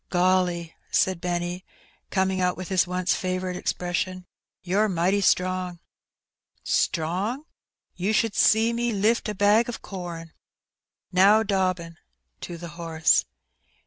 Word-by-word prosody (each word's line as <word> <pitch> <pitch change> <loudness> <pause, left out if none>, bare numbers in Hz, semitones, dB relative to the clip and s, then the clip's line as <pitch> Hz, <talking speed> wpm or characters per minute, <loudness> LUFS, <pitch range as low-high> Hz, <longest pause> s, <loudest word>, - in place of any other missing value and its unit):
"Gollj/* 180 -2 +1 0.2
said 185 -2 +1
Benny^ 175 0 -2 0.5
coming 190 -1 0
out 180 0 +1
with 185 -1 -6
his 185 -2 +2
once 180 0 0
&voiirite 185 0 -2
expression^ 180 +1 -3 0.4
'^you're 205 +4 +2
mighty 185 +3 +1
strong!" 185 -1 +1 0.9
"Strong? 190 - -1 0.5
You 185 +4 -1
should 220 0 +1
see 225 +2 +4
me 235 0 -1
lift 215 +3 +1
a 210 - -3
bag 210 +4 +3
o* - - -3
com! 175 -6 -7 0.8
Now, 200 +4 +5
Dobbin/* 185 -5 -1 0.4
to 170 - -7
the 170 0 -8
horse. 165 -1 +1
185 Hz, 120 wpm, -25 LUFS, 175-200 Hz, 0.9 s, Now